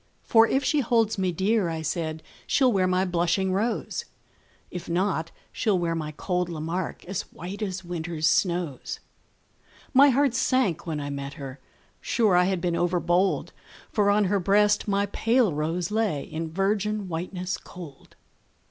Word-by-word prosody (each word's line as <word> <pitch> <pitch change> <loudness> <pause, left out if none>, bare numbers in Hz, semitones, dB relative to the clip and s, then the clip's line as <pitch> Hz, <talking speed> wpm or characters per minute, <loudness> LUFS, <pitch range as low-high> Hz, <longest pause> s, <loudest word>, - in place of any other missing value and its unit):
For 225 0 +5
if 270 +4 +1
she 300 - +2
holds 225 -4 +2
me 185 -1 +1
dear, 190 +2 +1
I 160 -1 -4
said, 160 0 -3 0.2
She'll 260 -2 +4
wear 185 -2 +2
my 185 +1 +2
blushing 180 +1 +1
rose; 220 +5 -1 0.7
If 180 -1 -6
not, 170 -2 0 0.2
she'll 210 -4 +1
wear 170 -1 0
my 155 -2 -3
cold 180 -2 -1
Lamarque, 165 +2 -4
As 185 +1 -2
white 190 +5 -7
as 190 -2 -3
winter's 170 -2 -3
snows. 170 -4 0 0.9
My 280 +2 +7
heart 275 -1 +3
sank 250 -9 +1
when 155 -2 -2
I 145 0 -4
met 140 0 -5
her: 135 -1 -8 0.4
sure 220 -6 +2
I 180 0 +5
had 190 -1 0
been 175 -1 0
overbold, 175 +2 +1 0.4
For 205 -2 +2
on 205 +1 +4
her 200 +1 +1
breast 205 +3 +3
my 200 0 +2
pale 225 -2 +2
rose 165 +5 -2
lay 210 -10 0
In 160 0 -5
virgin 205 +2 0
whiteness 180 +2 -3
cold. 165 -7 -12
185 Hz, 155 wpm, -26 LUFS, 165-210 Hz, 0.9 s, My